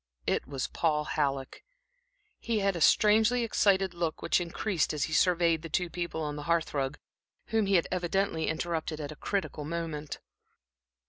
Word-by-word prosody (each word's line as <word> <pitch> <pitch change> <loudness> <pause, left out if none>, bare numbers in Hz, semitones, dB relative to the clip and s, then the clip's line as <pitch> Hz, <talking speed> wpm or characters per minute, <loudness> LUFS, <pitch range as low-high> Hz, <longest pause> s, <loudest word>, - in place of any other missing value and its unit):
It - - 0
was 135 -1 -3
Paul 150 -2 0
Halleck. 140 -3 -2 0.8
He 230 -2 -1
had 195 -2 +1
a 170 - -4
strangely 220 +6 +4
excited 195 -4 +2
look, 170 -2 -3
which 170 +2 +2
increased 175 0 -1
as 145 - 0
he 155 - -3
surveyed 170 0 +3
the 165 - -7
two 175 +2 -1
people 170 -2 -3
on 150 -1 -3
the - - -5
hearth 170 -1 +1
rug, 140 0 -1 0.5
whom 220 -2 +1
he 195 - +3
had 170 - +3
evidently 180 -1 0
interrupted 160 -1 -2
at 150 -1 -5
a - - -8
critical 155 -4 -3
moment. 155 -1 -4
170 Hz, 170 wpm, -29 LUFS, 150-190 Hz, 0.8 s, strangely